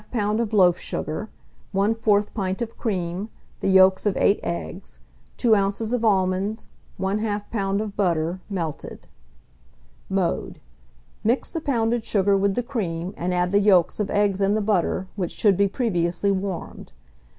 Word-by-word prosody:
of 215 Hz, +1 st, 0 dB
loaf 185 Hz, -5 st, +4 dB
sugar, 185 Hz, +8 st, -4 dB, 0.5 s
1/4 210 Hz, 0 st, +2 dB
pint 190 Hz, -3 st, -2 dB
of 230 Hz, 0 st, -8 dB
cream, 185 Hz, -2 st, -3 dB, 0.3 s
the -, -, -2 dB
yolks 190 Hz, +1 st, +5 dB
of 200 Hz, -, 0 dB
8 200 Hz, -, +3 dB
eggs, 80 Hz, -6 st, -5 dB, 0.4 s
2 230 Hz, -3 st, +4 dB
oz. 200 Hz, +3 st, 0 dB
of 245 Hz, -2 st, 0 dB
almonds, 195 Hz, +1 st, +1 dB, 0.3 s
1/2 205 Hz, +1 st, -1 dB
lb. 200 Hz, -3 st, 0 dB
of 210 Hz, -2 st, -5 dB
butter, 175 Hz, -2 st, 0 dB
melted. 170 Hz, -7 st, -5 dB, 1.0 s
Mode. 190 Hz, -3 st, -1 dB, 0.6 s
Mix 235 Hz, +5 st, +1 dB
the 330 Hz, -, -3 dB
pounded 235 Hz, -5 st, 0 dB
sugar 200 Hz, -2 st, +2 dB
with 195 Hz, 0 st, +1 dB
the 245 Hz, -, 0 dB
cream, 190 Hz, -8 st, -3 dB
and 180 Hz, +2 st, -2 dB
add 180 Hz, 0 st, 0 dB
the 200 Hz, -, +4 dB
yolks 195 Hz, -4 st, +3 dB
of 210 Hz, -, -1 dB
eggs 200 Hz, -1 st, +1 dB
and 200 Hz, +2 st, +2 dB
the -, -, 0 dB
butter, 190 Hz, -2 st, 0 dB
which 185 Hz, -5 st, -3 dB
should 205 Hz, -3 st, +3 dB
be 200 Hz, +2 st, +3 dB
previously 190 Hz, -4 st, 0 dB
warmed. 190 Hz, -2 st, -4 dB
200 Hz, 150 wpm, -24 LUFS, 185-215 Hz, 1.0 s, yolks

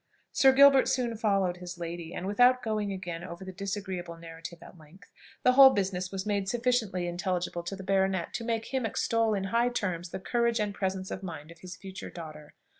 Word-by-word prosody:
Sir 270 Hz, -, +6 dB
Gilbert 275 Hz, 0 st, +7 dB
soon 240 Hz, -3 st, 0 dB
followed 195 Hz, -5 st, +1 dB
his 180 Hz, 0 st, -8 dB
lady, 170 Hz, -1 st, -6 dB
and, 180 Hz, -, -5 dB
without 245 Hz, +6 st, +4 dB
going 215 Hz, -2 st, -1 dB
again 175 Hz, -3 st, -5 dB
over 180 Hz, +1 st, -8 dB
the 190 Hz, -, -6 dB
disagreeable 190 Hz, -3 st, -5 dB
narrative 165 Hz, +1 st, -10 dB
at -, -, -13 dB
length, 170 Hz, +3 st, -18 dB, 0.3 s
the 250 Hz, -, +6 dB
whole 270 Hz, +1 st, +9 dB
business 190 Hz, -5 st, -1 dB
was 195 Hz, 0 st, -4 dB
made 200 Hz, -2 st, -1 dB
sufficiently 235 Hz, -7 st, 0 dB
intelligible 175 Hz, 0 st, -2 dB
to 175 Hz, +3 st, -5 dB
the 195 Hz, -, -9 dB
baronet 190 Hz, -2 st, 0 dB
to 235 Hz, -, -3 dB
make 230 Hz, +2 st, -3 dB
him 260 Hz, -1 st, 0 dB
extol 225 Hz, 0 st, +1 dB
in 195 Hz, -, -2 dB
high 235 Hz, +1 st, +3 dB
terms 180 Hz, -7 st, -3 dB
the 190 Hz, -, -5 dB
courage 235 Hz, +3 st, 0 dB
and 210 Hz, -1 st, -1 dB
presence 190 Hz, -1 st, -3 dB
of 185 Hz, -, -4 dB
mind 165 Hz, -4 st, -8 dB
of 170 Hz, -, -15 dB
his 180 Hz, +1 st, -9 dB
future 190 Hz, -1 st, -8 dB
daughter. 155 Hz, -3 st, -10 dB
190 Hz, 200 wpm, -29 LUFS, 175-225 Hz, 0.3 s, whole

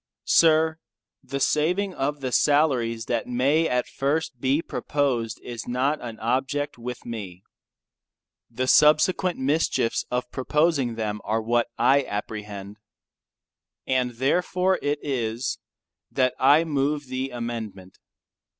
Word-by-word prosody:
Sir, 160 Hz, 0 st, +4 dB, 0.4 s
The 140 Hz, -, -5 dB
saving 180 Hz, +8 st, +1 dB
of 145 Hz, -1 st, -2 dB
the 130 Hz, -1 st, -3 dB
salaries 125 Hz, -7 st, +2 dB
that 120 Hz, -2 st, -2 dB
may 140 Hz, +7 st, +2 dB
at 125 Hz, 0 st, 0 dB
first 140 Hz, -1 st, -2 dB
be 135 Hz, +3 st, +2 dB
proposed 125 Hz, -6 st, -1 dB
is 120 Hz, -2 st, -7 dB
not 130 Hz, +5 st, 0 dB
an 115 Hz, -2 st, -7 dB
object 135 Hz, +4 st, -1 dB
with 125 Hz, +1 st, -7 dB
me. 100 Hz, -6 st, -7 dB, 1.1 s
The 125 Hz, +2 st, -2 dB
subsequent 155 Hz, +6 st, +4 dB
mischiefs 130 Hz, -3 st, 0 dB
of 125 Hz, 0 st, -2 dB
proposing 140 Hz, -2 st, +1 dB
them 105 Hz, -2 st, -3 dB
are 110 Hz, +1 st, 0 dB
what 120 Hz, +2 st, +1 dB
I 135 Hz, +4 st, +4 dB
apprehend. 105 Hz, -1 st, -6 dB, 1.1 s
And 125 Hz, -2 st, 0 dB
therefore 180 Hz, +8 st, +1 dB
it 145 Hz, +1 st, 0 dB
is, 120 Hz, -3 st, -2 dB, 0.5 s
that 130 Hz, -1 st, +1 dB
I 145 Hz, +5 st, +5 dB
move 145 Hz, -1 st, -1 dB
the 130 Hz, +1 st, -3 dB
amendment. 115 Hz, -6 st, -6 dB
130 Hz, 120 wpm, -25 LUFS, 115-150 Hz, 1.1 s, I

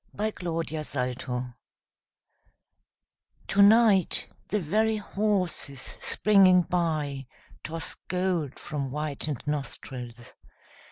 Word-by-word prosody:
WINTER 180 Hz, -6 st, -3 dB
EVENING 125 Hz, -4 st, -3 dB, 2.0 s
To 200 Hz, -, +4 dB
night 205 Hz, -3 st, +5 dB, 0.2 s
the 210 Hz, -, 0 dB
very 215 Hz, +6 st, +1 dB
horses 195 Hz, -9 st, 0 dB
springing 190 Hz, +3 st, +4 dB
by 155 Hz, -7 st, -1 dB, 0.4 s
Toss 160 Hz, 0 st, -5 dB
gold 180 Hz, -6 st, -1 dB
from 140 Hz, -3 st, -4 dB
whitened 150 Hz, -1 st, -3 dB
nostrils. 125 Hz, -4 st, -5 dB
160 Hz, 75 wpm, -27 LUFS, 140-195 Hz, 2.0 s, night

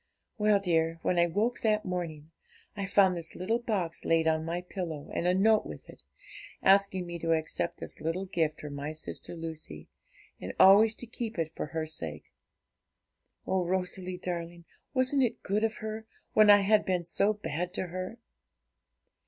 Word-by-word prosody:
'Well, 210 Hz, -1 st, +4 dB
dear, 165 Hz, -3 st, +1 dB
when 180 Hz, -, +1 dB
I 170 Hz, -, +4 dB
woke 215 Hz, +8 st, 0 dB
that 215 Hz, -1 st, +1 dB
morning, 165 Hz, -4 st, -4 dB, 0.4 s
I 200 Hz, -2 st, -3 dB
found 190 Hz, -1 st, +4 dB
this 165 Hz, -1 st, -6 dB
little 220 Hz, +6 st, 0 dB
box 195 Hz, -8 st, -2 dB
laid 165 Hz, 0 st, +2 dB
on 160 Hz, 0 st, +2 dB
my 170 Hz, +2 st, -3 dB
pillow, 175 Hz, -5 st, -6 dB
and 175 Hz, -, -1 dB
a 180 Hz, -, +3 dB
note 215 Hz, +3 st, +4 dB
with -, -, -9 dB
it, -, -, -12 dB, 0.6 s
asking 195 Hz, -1 st, +4 dB
me 175 Hz, 0 st, -6 dB
to 165 Hz, 0 st, +1 dB
accept 160 Hz, +2 st, -1 dB
this -, -, -6 dB
little 170 Hz, +4 st, -2 dB
gift 160 Hz, -4 st, -1 dB
from 150 Hz, -1 st, -7 dB
my 145 Hz, +2 st, -4 dB
sister 155 Hz, +2 st, -3 dB
Lucy, 160 Hz, -, -8 dB, 0.5 s
and -, -, -6 dB
always 215 Hz, +3 st, +7 dB
to 245 Hz, -, -6 dB
keep 230 Hz, -2 st, -5 dB
it 160 Hz, -1 st, -1 dB
for -, -, -3 dB
her 160 Hz, +1 st, -3 dB
sake. 80 Hz, -, -7 dB, 1.1 s
Oh, 190 Hz, -1 st, +1 dB
Rosalie 185 Hz, 0 st, -2 dB
darling, 170 Hz, -1 st, -5 dB, 0.3 s
wasn't 260 Hz, +2 st, +3 dB
it 245 Hz, -4 st, 0 dB
good 205 Hz, +2 st, 0 dB
of 225 Hz, 0 st, 0 dB
her, 220 Hz, 0 st, -5 dB, 0.3 s
when 215 Hz, -1 st, +6 dB
I 205 Hz, 0 st, +8 dB
had 210 Hz, +1 st, +4 dB
been 180 Hz, -2 st, 0 dB
so 200 Hz, +5 st, +3 dB
bad 180 Hz, -4 st, -4 dB
to -, -, +1 dB
her? 185 Hz, +5 st, -5 dB
180 Hz, 175 wpm, -29 LUFS, 165-205 Hz, 1.1 s, I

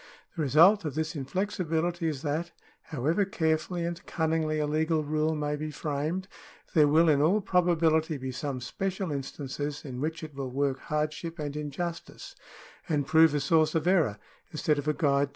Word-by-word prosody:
The 165 Hz, -, -2 dB
result 170 Hz, +8 st, +5 dB
of 150 Hz, -4 st, -4 dB
this 160 Hz, +1 st, -2 dB
inflexi 185 Hz, +7 st, -2 dB
bility 165 Hz, +1 st, -1 dB
is 145 Hz, -4 st, -5 dB
that, 160 Hz, +3 st, -2 dB, 0.3 s
however 155 Hz, +7 st, 0 dB
carefully 170 Hz, -2 st, -1 dB
and 170 Hz, 0 st, -4 dB
cunningly 160 Hz, -2 st, 0 dB
a 150 Hz, -, +1 dB
legal 155 Hz, +1 st, +1 dB
rule 155 Hz, +1 st, 0 dB
may 150 Hz, 0 st, -1 dB
be 155 Hz, +1 st, -4 dB
framed, 155 Hz, +5 st, -3 dB, 0.5 s
there 150 Hz, -3 st, +6 dB
will 160 Hz, +3 st, +4 dB
in 145 Hz, -3 st, +4 dB
all 180 Hz, +8 st, +4 dB
probability 165 Hz, -5 st, +2 dB
be 130 Hz, -1 st, -5 dB
some 130 Hz, 0 st, -4 dB
special 190 Hz, +8 st, -3 dB
instances 145 Hz, +1 st, -5 dB
in 130 Hz, -2 st, -6 dB
which 160 Hz, +2 st, -3 dB
it 155 Hz, -1 st, -7 dB
will 135 Hz, -1 st, -4 dB
work 135 Hz, 0 st, -1 dB
hardship 155 Hz, +2 st, -3 dB
and 145 Hz, -2 st, -4 dB
injustice, 160 Hz, +3 st, -5 dB, 0.5 s
and 145 Hz, -3 st, +1 dB
prove 160 Hz, +1 st, +5 dB
a -, -, +2 dB
source 155 Hz, +3 st, +2 dB
of 160 Hz, 0 st, +1 dB
error 165 Hz, -, +3 dB, 0.3 s
instead 150 Hz, -1 st, 0 dB
of 145 Hz, -, -5 dB
a 150 Hz, -, +3 dB
guide 140 Hz, -4 st, +2 dB
to 140 Hz, -, +3 dB
truth. -, -, -15 dB
155 Hz, 185 wpm, -28 LUFS, 145-165 Hz, 0.5 s, there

